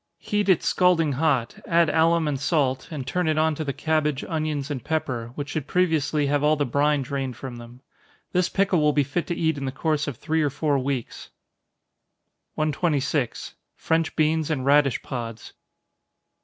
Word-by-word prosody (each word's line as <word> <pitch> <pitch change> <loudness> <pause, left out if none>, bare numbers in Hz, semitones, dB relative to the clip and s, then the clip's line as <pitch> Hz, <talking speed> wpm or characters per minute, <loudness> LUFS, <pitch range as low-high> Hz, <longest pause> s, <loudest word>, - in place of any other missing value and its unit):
Heat 205 -1 -1
it 185 - +4
scalding 175 -4 +3
hot 135 -4 0
add 170 0 +4
alum 165 +1 +3
and 140 -3 -1
salt, 135 -4 0
and 145 -5 -5
turn 180 +5 -1
it 155 -1 +1
on 160 0 +3
to 155 - -4
the 140 - -2
cabbage, 150 -1 0
onions 155 -3 -2
and 130 -5 -4
pepper, 140 -7 -2
which 145 0 -5
should 145 -2 -3
previously 155 -4 +1
have 145 +1 +1
all 150 +1 +4
the 145 -1 0
brine 145 +2 +1
drained 135 -3 -4
from 130 -3 -7
them. 120 +1 -12 0.5
This 180 0 +1
pickle 195 -4 +2
will 150 0 +3
be 145 - +3
fit 145 +6 -3
to 175 - -2
eat 160 -3 0
in 135 - -4
the 130 - -2
course 150 +2 -1
of 140 -5 -4
three 160 +3 0
or 150 - +2
four 145 0 0
weeks. 130 -2 -4 1.3
126. 150 -3 -1 0.3
_French 165 0 0
Beans 155 0 +1
and 140 -5 -1
Radish 140 -1 +3
Pods. 115 -4 -6
150 Hz, 180 wpm, -24 LUFS, 135-160 Hz, 1.3 s, it